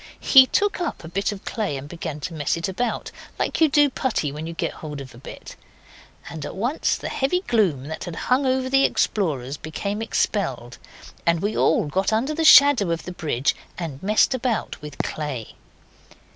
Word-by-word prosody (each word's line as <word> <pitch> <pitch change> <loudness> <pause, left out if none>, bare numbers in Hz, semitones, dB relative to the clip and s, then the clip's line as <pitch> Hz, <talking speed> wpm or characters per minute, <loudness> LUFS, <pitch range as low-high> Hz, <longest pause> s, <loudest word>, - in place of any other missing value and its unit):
He 265 -2 +7
took 410 +3 0
up 335 - -3
a - - -8
bit 195 +5 -1
of 205 -1 -9
clay 205 -11 -2
and 135 +1 -8
began 160 -2 -6
to 170 - -5
mess 150 0 -1
it 165 - -2
about, 215 +6 -3 0.3
like - - -2
you 320 - +6
do 290 0 +5
putty 245 - -1
when 150 +3 -6
you 165 - -5
get - - -3
hold 150 -2 -6
of 130 -2 -10
a 120 - -13
bit. - - -10 0.7
And 160 -3 -7
at - - -6
once 245 +10 0
the - - -6
heavy 275 +7 0
gloom 200 - +1
that 160 +1 -6
had 175 -2 -6
hung 260 +7 +1
over 260 0 +1
the 270 +1 +3
explorers 145 - 0
became 200 +8 -4
expelled, 135 - -2 0.4
and 170 0 +2
we 205 +5 -2
all 160 - +3
got 190 +7 0
under 240 +8 0
the 325 +1 -1
shadow 280 - +7
of 165 -1 -2
the 180 - -6
bridge 145 -7 -1 0.2
and 155 -6 -6
messed 210 +6 +3
about 250 -3 -2
with 150 -1 -9
clay. 145 -7 -5
185 Hz, 195 wpm, -23 LUFS, -, 0.7 s, He